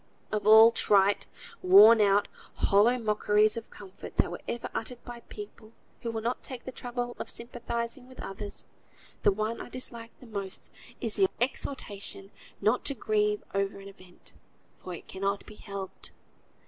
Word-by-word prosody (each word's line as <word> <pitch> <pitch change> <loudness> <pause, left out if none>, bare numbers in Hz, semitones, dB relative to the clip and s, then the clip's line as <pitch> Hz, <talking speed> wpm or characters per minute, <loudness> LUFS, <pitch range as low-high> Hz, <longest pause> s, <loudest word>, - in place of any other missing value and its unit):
Of 210 -1 -1
all 220 +1 +9
trite, 200 -2 +3 0.3
worn 210 +5 +8
out, 205 0 +4 0.3
hollow 215 +5 +4
mockeries 210 -1 +2
of 230 -1 -6
comfort 195 -1 -11
that - - +2
were - - -6
ever 235 - -3
uttered 240 +1 -5
by 240 -1 -8
people 235 - -10 0.3
who 235 - -3
will 225 -1 -4
not 240 +2 -1
take 255 -3 -5
the 260 - -5
trouble 245 -1 -4
of - - -5
sympathising 235 +1 -4
with 260 - -15
others, 200 +1 -4 0.6
the - - +5
one 215 +3 -2
I - - -8
dislike 235 -2 -7
the - - -13
most 200 -4 -5 0.3
is - - -2
the 385 -1 +4
exhortation 205 -6 -2 0.3
not 215 +5 +2
to 280 - 0
grieve 210 -2 0
over 195 0 -1
an 195 0 -10
event, 185 -2 -15 0.5
"for 180 - -7
it - - -12
cannot 195 +1 -2
be - - -11
helped." 200 -2 -7
215 Hz, 160 wpm, -29 LUFS, 200-235 Hz, 0.6 s, all